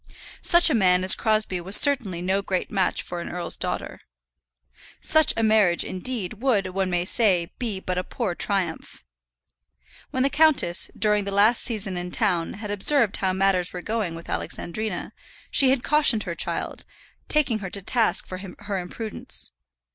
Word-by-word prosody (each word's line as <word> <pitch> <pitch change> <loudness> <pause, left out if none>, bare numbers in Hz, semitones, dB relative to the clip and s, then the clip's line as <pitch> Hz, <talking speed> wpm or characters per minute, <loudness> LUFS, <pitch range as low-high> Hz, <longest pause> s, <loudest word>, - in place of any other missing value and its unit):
Such 345 -2 +5
a - - +1
man 185 -5 +3
as 185 - +9
Crosbie 215 -5 0
was 190 +4 +2
certainly 230 - +3
no 190 +2 0
great 190 -2 -3
match 190 -3 0
for 175 -1 -7
an - - -7
earl's 175 -1 -2
daughter. - - -5 1.0
Such 315 0 +4
a 225 - +1
marriage, 215 -6 +3
indeed, 210 0 -4
would, 235 -8 +1
one 190 0 -2
may 175 -1 -1
say, 185 -5 +1
be 225 -6 -3
but 185 -1 -3
a - - -3
poor 210 -1 -4
triumph. 180 - -3 1.1
When 260 - -1
the 275 - +1
countess, 295 - +3
during 210 -1 +1
the 200 - -4
last 210 +4 +3
season 205 -6 -2
in 175 0 -5
town, 180 -5 -1
had 205 0 -7
observed 215 +2 +3
how 190 -1 0
matters 190 -2 0
were 180 -1 -7
going 215 -7 -3
with 165 - -11
Alexandrina, 210 +1 -4 0.4
she 270 - +5
had 265 -2 +1
cautioned 290 -8 +3
her 175 - -5
child, - - -2 0.4
taking 275 -8 +1
her 190 -2 -6
to 200 +1 -2
task 230 +2 +1
for 185 - -8
her 195 +1 -6
imprudence. 210 - -7
200 Hz, 170 wpm, -23 LUFS, 180-225 Hz, 1.1 s, as